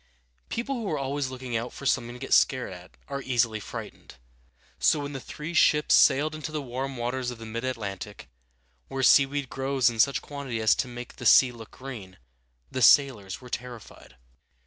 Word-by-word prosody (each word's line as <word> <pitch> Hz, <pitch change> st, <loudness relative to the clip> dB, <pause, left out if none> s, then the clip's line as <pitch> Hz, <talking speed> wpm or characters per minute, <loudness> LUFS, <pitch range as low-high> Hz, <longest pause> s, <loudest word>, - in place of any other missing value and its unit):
People 240 Hz, +4 st, -3 dB
who 220 Hz, -4 st, -4 dB
are 155 Hz, -, -1 dB
always 135 Hz, 0 st, -2 dB
looking 130 Hz, -2 st, -6 dB
out 115 Hz, +2 st, -2 dB
for 140 Hz, -, -10 dB
something 120 Hz, -2 st, 0 dB
to -, -, -10 dB
get 135 Hz, -, -2 dB
scared 130 Hz, -7 st, +3 dB
at 90 Hz, +1 st, -14 dB
are 140 Hz, 0 st, -4 dB
easily 120 Hz, -4 st, 0 dB
frightened; -, -, -9 dB, 0.6 s
so 155 Hz, -, +3 dB
when 145 Hz, 0 st, -5 dB
the 135 Hz, -, -4 dB
three 150 Hz, +6 st, -7 dB
ships 150 Hz, -2 st, +4 dB
sailed 150 Hz, +3 st, +5 dB
into 155 Hz, 0 st, -6 dB
the 155 Hz, -, -2 dB
warm 135 Hz, 0 st, -5 dB
waters 125 Hz, +1 st, -2 dB
of 125 Hz, -, -7 dB
the 115 Hz, -, -9 dB
middle 115 Hz, +3 st, -3 dB
Atlantic, 105 Hz, -, -6 dB, 0.6 s
where 135 Hz, 0 st, -3 dB
seaweed 140 Hz, +1 st, +4 dB
grows 135 Hz, -1 st, +1 dB
in 115 Hz, -, -8 dB
such 140 Hz, +5 st, +4 dB
quantity 140 Hz, -5 st, -6 dB
as 110 Hz, 0 st, +4 dB
to -, -, -2 dB
make 120 Hz, 0 st, -9 dB
the 125 Hz, -, -8 dB
sea 125 Hz, +3 st, +7 dB
look 115 Hz, -2 st, -11 dB
green, 115 Hz, -9 st, -9 dB, 0.5 s
the 130 Hz, -, -3 dB
sailors 115 Hz, -7 st, +4 dB
were 125 Hz, -, -12 dB
terrified. 120 Hz, -, -8 dB
130 Hz, 190 wpm, -27 LUFS, 115-140 Hz, 0.6 s, sea